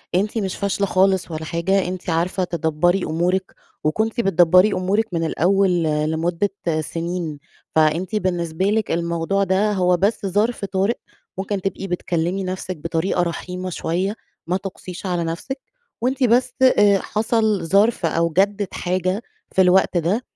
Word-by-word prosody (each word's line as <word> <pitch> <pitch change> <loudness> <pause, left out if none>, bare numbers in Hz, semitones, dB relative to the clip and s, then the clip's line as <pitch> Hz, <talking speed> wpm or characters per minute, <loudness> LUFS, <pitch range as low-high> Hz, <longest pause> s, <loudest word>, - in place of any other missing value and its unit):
أنتِ 205 +5 0
مش 195 -4 -2
فاشلة 200 0 -1
خالص 190 -2 +2
ولا 160 0 -4
حاجة، 180 +4 0
أنتِ 185 0 -5
عارفة 175 +3 0
تدبّري 170 +2 +1
أمورِك 180 +4 -1 0.3
وكنتِ 220 +10 0
بتدبّري 180 +1 +5
أمورِك 190 +4 +1
من 165 -1 0
الأول 180 +2 +2
لمدة 160 +5 0 0.3
سِنين، 165 -2 -4 0.4
فأنتِ 160 +6 +2
بالنسبة 175 -3 -1
لِك 215 +1 +1
الموضوع 170 +3 0
ده 195 +3 +2
هو 180 -2 +2
بس 200 +3 0
ظرف 205 +3 0
طارئ 195 +4 0 0.4
ممكن 195 0 -2
تبقي 195 +1 -3
بتكلّمي 180 +1 -1
نَفْسِك 185 -1 -4
بطريقة 165 +3 -1
رحيمة 180 +2 -4
شوية. 185 +4 -2 0.3
ما 180 +2 +1
تُقسيش 185 -1 -8
على 175 -2 -1
نَفْسِك 170 +12 -4 0.4
وأنتِ 260 +3 0
بس 245 +1 +3
آآ 205 -6 +5
حصل 220 -1 0
ظرف 200 +3 +3
أو 165 +1 +1
جَدِّت 200 0 +1
حاجة 185 +3 -1 0.3
في 190 - +3
الوقت 185 0 +4
ده 175 +8 +1
185 Hz, 140 wpm, -21 LUFS, 170-200 Hz, 0.4 s, بتدبّري